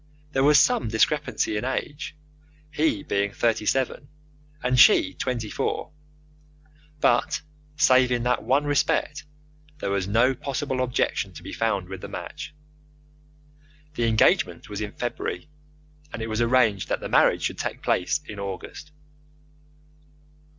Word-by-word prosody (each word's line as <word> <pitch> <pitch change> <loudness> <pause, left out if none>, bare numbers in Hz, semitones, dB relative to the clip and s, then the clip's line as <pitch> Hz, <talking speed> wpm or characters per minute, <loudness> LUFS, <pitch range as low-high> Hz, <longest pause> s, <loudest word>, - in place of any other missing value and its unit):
There 135 -2 +1
was 145 0 +6
some 200 - +3
discrepancy 110 -1 0
in 105 - -3
age, 145 +4 -4 0.6
he 150 -9 0
being 100 0 -1
thirty 115 -2 0
seven, 135 +3 0 0.6
and 125 0 +2
she 95 -6 +6
twenty 120 +2 -3
four; - - -2 1.1
but, - - +2 0.3
save 130 -2 +5
in 120 -1 0
that 125 0 +1
one 130 +7 +2
respect, 145 +1 0 0.5
there 100 -9 -3
was 100 -2 -1
no 115 +6 +3
possible 135 0 -3
objection 125 -1 -1
to - - -11
be - - -8
found 100 -5 -1
with 95 0 -8
the - - -6
match. - - -8 1.4
The 120 -5 0
engagement 110 -1 +2
was 105 0 -5
in 105 0 -5
February, 120 +4 -4 0.6
and - - -6
it 110 - -4
was 110 +1 -1
arranged 115 -5 +2
that - - 0
the - - -5
marriage - - +3
should - - -2
take - - -4
place 150 +12 +1
in 105 - -8
August. 100 - -7
120 Hz, 140 wpm, -25 LUFS, 105-135 Hz, 1.4 s, was